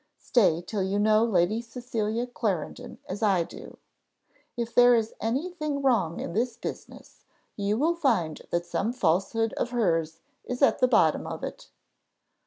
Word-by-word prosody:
Stay 175 -8 +2
till 205 +2 -3
you 190 +2 0
know 215 +1 +4
Lady 215 0 +2
Cecilia 235 -1 -3
Clarendon 215 -9 -4
as 195 +3 -5
I 195 -5 +3
do. - - -11 0.8
If 235 -1 -3
there 245 0 +7
is 225 -1 -1
any 270 +11 -1
thing 305 -5 -3
wrong 195 -11 +1
in - - -5
this 235 +3 -1
business, - - -9 0.3
you 205 +1 -1
will 320 +7 +2
find 180 - 0
that 170 0 -1
some 220 +6 -2
falsehood 210 +2 +1
of - - -1
hers 165 -9 0 0.2
is 250 +3 -3
at - - +4
the 255 - +4
bottom 170 -11 +3
of - - -6
it." - - -7
225 Hz, 160 wpm, -27 LUFS, 185-245 Hz, 0.8 s, there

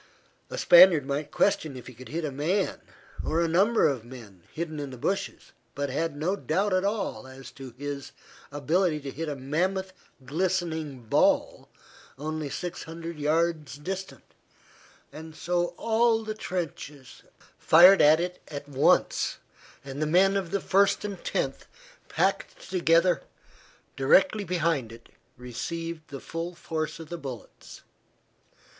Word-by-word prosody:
A - - -6
Spaniard 175 - +7
might 145 +1 -3
question 155 -8 +1
if 125 - -10
he 125 - -10
could 125 +2 -12
hit 160 +2 -3
a 150 - -3
man, 170 +9 -1 0.4
or 160 - 0
a 170 - +2
number 195 +8 +3
of 130 -5 -2
men, 115 -7 -12
hidden 155 -2 -5
in 145 -1 -4
the 130 - -9
bushes, 195 +11 -3 0.2
but 140 -1 -2
had 160 +2 -2
no 175 +6 0
doubt 195 +2 0
at 185 0 +2
all 195 - -2
as 130 -1 -11
to 130 -3 -11
his 145 0 -6 0.4
ability 155 +3 +1
to 140 -1 -6
hit 160 +3 -4
a 145 - -3
mammoth 185 +8 -2 0.3
glistening 160 -3 -2
ball 110 - +1 0.5
only 155 +1 -4
six 175 +4 -5
hundred 165 0 -7
yards 155 -1 0
distant, 180 -4 -6 0.9
and 160 0 -10
so 175 +1 -1
all 225 0 +2
the 215 0 -4
trenches 150 -9 -6 0.4
fired 180 +4 +7
at 155 +2 +6
it 180 +1 -4
at 145 -1 -7
once, 140 0 +2 0.5
and 140 +2 -6
the 155 - +1
men 190 +5 +4
of 190 -3 -1
the 200 - 0
First 200 +2 +2
and 200 -2 -6
Tenth, - - -2 0.4
packed - - -1
together 170 0 +3 0.7
directly 190 +9 +3
behind 165 -9 0
it, 115 0 -14 0.3
received 160 +6 -6
the 140 - -8
full 165 +4 -5
force 155 -2 -4
of 160 -2 -10
the 175 - -6
bullets. 130 -6 -10
160 Hz, 145 wpm, -27 LUFS, 140-185 Hz, 0.9 s, Spaniard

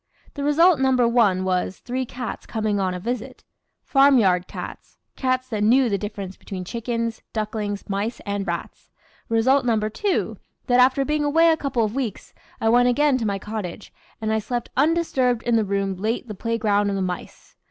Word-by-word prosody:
The 285 - -5
result 315 +2 +4
number 260 -2 +3
one 210 -6 +3
was, 185 0 -1
three 255 +1 -4
cats 245 -1 -6
coming 215 -2 -1
on 185 -1 0
a - - -4
visit. 245 +5 -5 0.4
Farmyard 235 -11 +4
cats - - -9 0.2
cats 255 -1 0
that 215 -3 -2
knew 245 +3 +4
the 200 - +1
difference 200 -2 -6
between 185 -3 -7
chickens, 230 +2 -3
ducklings, 210 -2 -3
mice, 205 +4 -2
and 200 -1 -3
rats. 170 -1 -5 0.4
Result 255 +5 +3
number 220 -3 0
two, 400 - -1 0.3
that 245 -1 +3
after 260 +2 +4
being 300 +1 0
away 325 +3 +4
a - - +3
couple 270 -6 -1
of 210 - -4
weeks, 250 -6 -4 0.3
I 225 - 0
went 245 +2 +5
again 275 +1 +3
to 225 - -1
my 200 -1 -1
cottage, 210 -2 -6 0.3
and 220 0 -1
I 220 - +2
slept 240 +2 -4
undisturbed 270 -5 +2
in 240 - +1
the 225 - +3
room 195 -1 -1
late 220 +6 -2
the 215 - -5
play 230 +3 -2
ground 205 -2 +2
of 200 - -1
the 195 - -1
mice. 180 -1 -6
230 Hz, 185 wpm, -23 LUFS, 205-255 Hz, 0.4 s, went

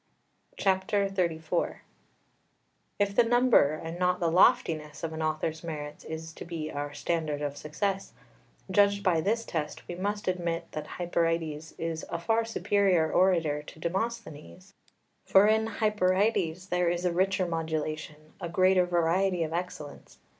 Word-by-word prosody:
XXXIV 190 -4 0 1.2
If 200 -1 0
the 240 - +6
number 240 - +4
and 165 +2 -6
not 180 0 +2
the 170 -2 +1
loftiness 155 -3 +3
of 160 -1 -3
an 160 - -4
author's 155 +1 -2
merits 150 -3 -6
is 160 0 -6
to - - -8
be 165 -2 -5
our 145 0 -4
standard 150 -1 -2
of 145 -1 -3
success, 195 +7 -3 0.6
judged 200 +1 +3
by 170 -4 +3
this 225 +5 0
test 150 -3 -4
we - - -5
must 205 +3 -3
admit 170 -2 -2
that 155 - -5
Hyperides 165 -3 -1
is 165 -1 -3
a 170 - -2
far 225 +6 +1
superior 195 -7 +2
orator 165 -6 +3
to 150 - -13
Demosthenes. 170 - -4 0.5
For 195 +1 +5
in 220 +1 +3
Hyperides 195 -4 +1
there 180 -1 +2
is 175 +1 -2
a 180 - +2
richer 190 +1 +1
modulation, 155 -2 -4
a 170 - -4
greater 185 +1 +3
variety 175 +1 +1
of 160 0 -4
excellence. 165 - -6
170 Hz, 140 wpm, -28 LUFS, 160-195 Hz, 1.2 s, the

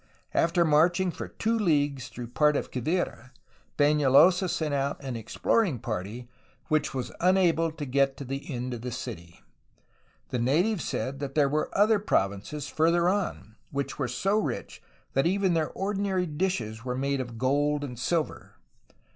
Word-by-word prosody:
After 170 +1 +3
marching 175 +4 +3
for - - -6
two 225 +1 -1
leagues 145 - +1
through 120 -2 -8
part 150 +4 +3
of - - -2
Quivira, 130 -2 -2 0.5
Penalosa 150 +5 +5
sent 155 -3 -1
out 140 0 -1
an 130 -3 -4
exploring 140 - 0
party 110 +1 -5 0.4
which 155 -1 +1
was 130 -2 -3
unable 175 -3 +3
to 155 -2 -5
get 135 +1 +1
to - - -6
the 135 +3 -5
end 125 0 -3
of 120 - -6
the 125 - -4
city. 85 -6 -7 0.9
The 125 - -2
natives 165 - +1
said 135 +1 -3
that 140 -1 -5
there 145 -2 +4
were 150 +2 0
other 210 +1 +5
provinces 105 - -1
farther 170 +2 +2
on, 185 - -3
which 140 +1 -4
were 135 - 0
so 195 - +1
rich - - -4 0.3
that 135 +4 +2
even 190 0 +2
their 160 -2 +1
ordinary 195 -2 -1
dishes 150 - -2
were 125 -1 -3
made 140 0 0
of 120 -2 -7
gold 145 +4 +1
and 125 -4 -6
silver. 160 +4 -2
145 Hz, 160 wpm, -27 LUFS, 130-175 Hz, 0.9 s, Penalosa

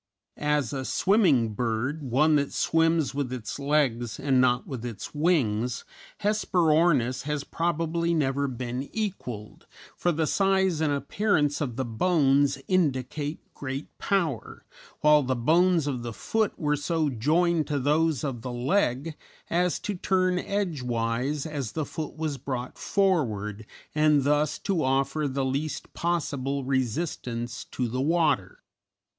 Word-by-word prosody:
As 150 -4 0
a 135 -1 -2
swimming 150 - +3
bird, 120 +7 -1
one 145 +4 +3
that 140 -1 -1
swims 165 -2 +2
with 140 -3 -2
its 125 0 -5
legs 135 -6 0
and 135 -2 +3
not 125 0 +2
with 130 -5 -6
its 120 -4 -6
wings, 125 -7 +1 0.4
Hesperornis 165 - +2
has 150 -1 -2
probably 170 +1 -1
never 140 -2 +1
been 125 0 -4
equalled, 130 - -5 0.3
for 175 - +1
the 160 0 0
size 190 -2 +2
and 155 -2 +2
appearance 145 0 +1
of 125 -6 -2
the 130 +1 -2
bones 140 +1 +2
indicate 145 -3 -1
great 135 +1 -6
power, 170 - -1 0.4
while 150 0 +6
the 130 -1 -1
bones 165 +6 +3
of 135 -4 -2
the 120 -1 -5
foot 210 - -1
were 150 -2 +1
so 155 0 0
joined 160 +7 +2
to 145 - -1
those 150 0 +1
of 130 -5 -3
the 125 - -5
leg 135 +2 0 0.4
as 180 +1 +2
to 210 - -2
turn 185 -1 +1
edgewise 135 - -1
as 140 -8 -4
the 155 -2 -2
foot 155 -1 -6
was 155 -3 -3
brought 130 -2 -4
forward 110 - 0 0.3
and 150 -2 +4
thus 150 +1 +2
to 185 -6 -1
offer 135 +3 +1
the 135 0 -1
least 140 +4 -3
possible 140 -5 -1
resistance 125 -2 -2
to 125 - -3
the 125 +3 -2
water. 150 - +1
145 Hz, 140 wpm, -27 LUFS, 130-165 Hz, 0.4 s, while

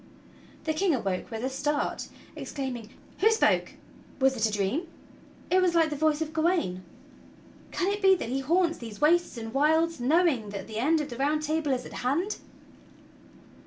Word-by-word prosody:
The 315 - 0
King 345 0 +2
awoke 195 -6 -3
with 225 0 -5
a 260 - 0
start, 290 +2 -1 0.3
exclaiming: 255 -6 -5 0.3
"Who 435 - +5
spoke? 445 0 +2 0.5
Was 265 0 +3
it 225 -2 +2
a - - -3
dream? 210 - -1 0.6
It 370 +1 +5
was 355 -2 +2
like 325 -2 +3
the - - -1
voice 310 +1 +1
of 315 0 -9
Gawain. 320 - 0 0.9
Can 375 +2 0
it 410 - -4
be 385 -1 +6
that 325 - -5
he 265 +2 -1
haunts 335 +5 +1
these 225 -3 -8
wastes 330 -1 +3
and 225 -1 -6
wilds 320 +3 +2
knowing 270 - +2
that 200 -2 -6
the 220 +1 -5
end 310 +6 +3
of 300 - -5
the 240 - -6
Round 300 +3 +1
Table 310 -1 0
is 255 -1 -1
at - - -10
hand?" 335 +12 0
295 Hz, 180 wpm, -28 LUFS, 245-335 Hz, 0.9 s, be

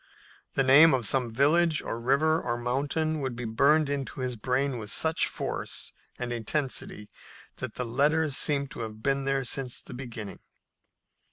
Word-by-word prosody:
The 135 - +3
name 140 +4 +7
of 125 -3 -2
some 125 +2 +1
village 150 +6 +3
or 115 - -5
river 155 +6 +2
or 120 - -2
mountain 145 +6 -1
would 130 -3 -3
be 120 0 -5
burned 140 +7 +3
into 140 -2 -4
his 125 -1 -2
brain 125 +3 -1
with 105 -2 -6
such 160 +7 +3
force - - -4 0.2
and 120 0 -4
intensity 120 -3 -3 0.5
that - - -6
the 125 - -3
letters 145 +5 +1
seemed 140 -1 +1
to - - -9
have 110 -1 -7
been 140 0 0
there 135 0 0
since 125 0 -1
the - - -11
beginning. 115 -5 -7
135 Hz, 165 wpm, -27 LUFS, 120-145 Hz, 0.5 s, name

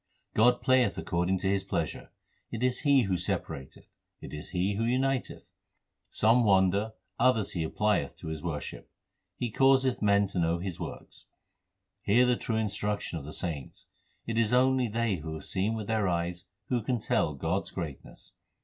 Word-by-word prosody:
God 120 +3 +4
playeth 130 -1 +3
according 90 +2 0
to 95 - 0
His 95 0 +1
pleasure: 85 -6 -3 0.4
It 115 +1 -4
is 125 -1 +2
He 140 -3 +4
who 95 -3 0
separateth, 70 -5 -4 0.3
it - - -10
is 75 0 -7
He 95 +2 0
who 105 +3 -1
uniteth. 130 +2 0 0.6
Some 115 +3 +3
wander, 100 +1 +3 0.3
others 120 -4 +3
He 85 - -2
applieth 105 -2 0
to - - -8
His 80 -1 -5
worship. 80 -4 -5 0.5
He 120 -2 -2
causeth 135 0 +3
man 100 -1 +4
to 95 - -2
know 85 0 +2
His 90 -1 -5
works. - - -8 0.7
Hear 115 +6 +4
the 125 0 +3
true 115 -1 -2
instruction 105 -4 -2
of 70 - -10
the 75 - -7
saints 75 -8 -5 0.4
It 115 0 -1
is 115 +1 +2
only 130 0 +4
they 115 -2 0
who 80 0 -6
have 80 - -8
seen 100 +4 0
with 110 -2 -4
their 110 -2 0
eyes 85 0 -2 0.2
who 125 -2 +1
can 125 +3 0
tell 75 -7 0
God 80 +7 -1
s - - -5
greatness. 80 -7 -8
105 Hz, 175 wpm, -29 LUFS, 85-120 Hz, 0.7 s, God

